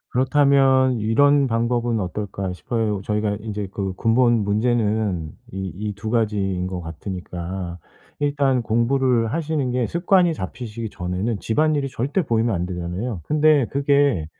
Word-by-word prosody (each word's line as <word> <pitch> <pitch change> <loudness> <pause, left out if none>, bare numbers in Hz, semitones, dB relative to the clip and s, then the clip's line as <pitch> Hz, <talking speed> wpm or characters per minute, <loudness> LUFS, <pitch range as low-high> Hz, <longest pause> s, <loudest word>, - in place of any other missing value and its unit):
그렇다면 130 -1 +3
이런 140 +6 +3
방법은 115 -1 0
어떨까 95 0 -4
싶어요. 105 +4 -2
저희가 105 -1 0
인제 105 -2 -4
그 95 -2 -3
근본 115 0 +3
문제는 105 -5 0 0.2
이 95 0 -4 0.2
이 - - -6
2 105 +2 -5
가지인 100 -5 0
것 90 -1 -4
같으니까 90 +1 -6 0.4
일단 140 -3 +1
공부를 120 0 +1
하시는 155 -4 -1
게 125 -2 0
습관이 175 0 +2
잡히시기 115 -1 -6
전에는 95 +5 -3
집안일이 150 +3 +1
절대 135 +8 -1
보이면 115 - +1
안 90 0 -1
되잖아요. 90 +4 -4
근데 150 -4 +3
그게 140 - +2
115 Hz, 305 characters per minute, -22 LUFS, 100-135 Hz, 0.4 s, 그렇다면